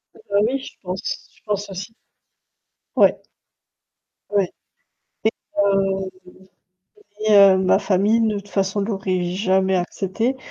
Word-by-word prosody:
Ah - - -17
bah, 200 - +1
oui, 270 +3 -1
je 270 - -10
pense 185 0 -5
je - - -26
pense 205 -1 -2
aussi. 200 +4 -7 1.0
Ouais. - - +4 1.1
Ouais 200 -3 +1 0.8
et 220 - +4 0.3
heu, 195 -1 +1 1.1
et 215 0 +2
heu, 195 -2 +8
ma 185 +1 +3
famille, 205 +3 +2
de 215 -1 0
toute 200 0 -12
façon 195 0 0
l'aurais 195 -3 -1
jamais 190 +1 +1
accepté. 195 +7 -1
195 Hz, 125 wpm, -21 LUFS, 190-210 Hz, 1.1 s, heu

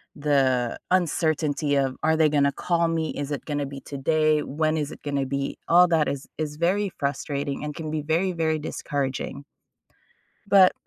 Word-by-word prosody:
the 135 -5 +1
uncertainty 155 -4 +1
of, 135 -2 0
"Are 160 0 +3
they 155 -1 +4
gonna 140 -1 +3
call 170 +3 0
me? 160 -2 -1
Is 145 0 -5
it 145 - -4
gonna 145 -2 -2
be 135 0 -8
today? 155 +2 +1
When 155 +2 0
is 150 0 -2
it - - -11
going 145 -1 -3
to 135 - 0
be?" 140 +1 -3
All 180 +1 +6
that 160 -3 +2
is 140 0 -4
is 150 -1 -3
very 190 +5 +1
frustrating 140 0 -2
and 150 -1 -4
can 155 -2 -5
be 155 -1 -1
very, 170 +5 +1
very 160 -2 0
discouraging. 140 -2 -3 1.1
But 190 -2 +7
150 Hz, 175 wpm, -25 LUFS, 140-160 Hz, 1.1 s, But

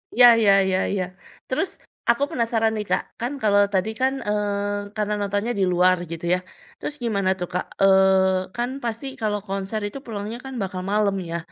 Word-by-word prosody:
Iya 245 0 +9
iya 210 -3 +5 0.2
iya 185 0 +1
iya. 195 -2 0 0.4
Terus 260 +9 0 0.4
aku 235 +4 +4
penasaran 225 -2 +1
nih 210 -1 -3
Kak, - - +2 0.2
kan 240 +3 -2
kalau 205 -1 +5
tadi 190 +2 +1
kan, 265 +1 +3
eee, 205 0 -1
karena 210 -1 -1
nontonnya 205 +3 -1
di - - +3
luar 180 +1 +4
gitu 165 0 -5
ya. - - +3 0.4
Terus 295 - -5
gimana 200 -5 +1
tuh, 180 - -3
Kak, 180 - -1 0.2
eee, 190 -1 +4
kan 240 +1 -1
pasti 230 +2 -3 0.2
kalau 210 -1 0
konser 195 +2 -3
itu 205 - -7
pulangnya 215 0 -5
kan 265 - -7
bakal 185 -1 -3
malem 205 -1 +2 0.2
ya, 170 - -1
205 Hz, 180 wpm, -23 LUFS, 190-225 Hz, 0.4 s, Iya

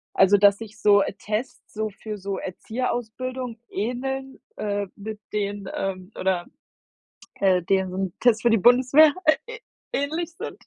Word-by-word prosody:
Also, 195 +1 +6
dass 200 0 +5
sich 220 -1 -10
so, 205 -1 +6
äh, - - -2
Tests, 210 +5 -5
so 215 0 -2
für 210 +1 -7
so 195 0 -4
Erzieherausbildung 245 +4 -4
ähneln, 265 +5 -3 0.2
äh, 205 -1 -2
mit 210 +1 -7
denen 205 -1 -2
ähm, 185 -1 -4
oder, 185 -2 0 0.9
äh, 185 -3 +2
deren 190 0 0
Tests 235 -2 +4
für 240 - +4
die 225 - +4
Bundeswehr, 255 +7 +6
äh, 315 +10 +2
ä - - -7 0.3
ähnlich 320 +4 -2
sind. - - -7
215 Hz, 145 wpm, -24 LUFS, 195-250 Hz, 0.9 s, Also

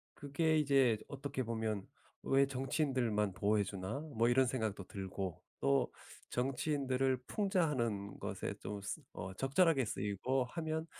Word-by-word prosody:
그게 155 +3 +1
이제 135 -6 +4
어떻게 140 -1 -3
보면 110 -3 -2 0.4
'왜 135 0 +4
정치인들만 130 - 0
보호해 105 +2 +2
주나?' 95 +5 -4 0.2
뭐 115 +1 +4
이런 130 +1 +5
생각도 110 -6 -2
들고 95 -2 -5 0.2
또 70 0 +2 0.4
정치인들을 130 0 0
풍자하는 130 - 0
것에 - - -3
좀 105 0 -5
쓰 95 - -4
어 95 +1 -5
적절하게 135 - +3
쓰이고 105 +6 0
하면 160 +3 -3
125 Hz, 285 characters per minute, -36 LUFS, 105-140 Hz, 0.4 s, 이런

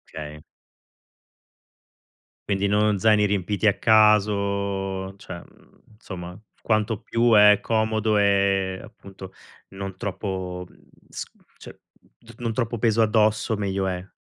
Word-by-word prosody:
Okay. 75 0 -8 2.1
Quindi 100 0 +1
non 105 0 +2
zaini 105 +1 +3
riempiti 105 +1 0
a 100 - +2
caso, 100 -3 +2
cioè, 85 -3 -9
mhmm, - - -24 0.2
somma 90 -3 -9 0.2
quanto 110 -1 0
più 115 0 +1
è 105 -1 +7
comodo 110 -1 0
e 100 -2 +1
appunto 95 -3 -13 0.4
non 95 -1 -7
troppo 95 -2 -5
mhmm, - - -23 0.3
s - - -6 0.3
cioè, - - -13 0.4
d 115 -1 -17
non 115 -2 -3
troppo 115 0 -2
peso 115 0 +2
addosso 110 0 +2
meglio 100 -1 -2
è. 90 0 -4
100 Hz, 120 wpm, -24 LUFS, 95-110 Hz, 2.1 s, è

